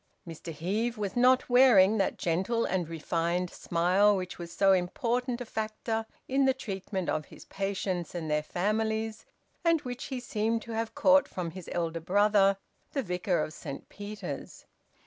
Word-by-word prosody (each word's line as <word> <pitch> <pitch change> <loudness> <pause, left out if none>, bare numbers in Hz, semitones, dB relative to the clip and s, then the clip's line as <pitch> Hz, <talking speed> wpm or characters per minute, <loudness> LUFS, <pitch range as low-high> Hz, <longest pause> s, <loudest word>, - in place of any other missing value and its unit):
Mr 165 0 -7
Heve 205 +10 -2
was 200 -2 -3
not 250 +1 +4
wearing 225 -5 +6
that 195 - 0
gentle 190 +8 0
and 180 -4 -1
refined 170 +2 -1
smile 185 +5 +3
which 185 -1 -5
was 170 -1 -7
so 195 +1 +4
important 235 +7 0
a - - -4
factor 220 0 -3 0.2
in 270 +1 +2
the 265 -1 +3
treatment 195 -6 -4
of 155 -1 -1
his - - -14
patients 190 -3 -3
and 165 -2 -3
their 150 0 +1
families, 220 +6 -1 0.4
and 335 -2 +3
which 250 -3 -6
he 260 -2 -4
seemed 225 -2 -1
to 235 - -8
have 225 0 -3
caught 280 0 +5
from 175 -3 -4
his 185 0 -9
elder 165 -1 -1
brother, 195 +2 +4 0.4
the 275 - 0
vicar 180 -3 0
of 155 - -6
Saint 140 -4 -8
Peter's. 205 +1 -7
200 Hz, 165 wpm, -29 LUFS, 175-230 Hz, 0.4 s, wearing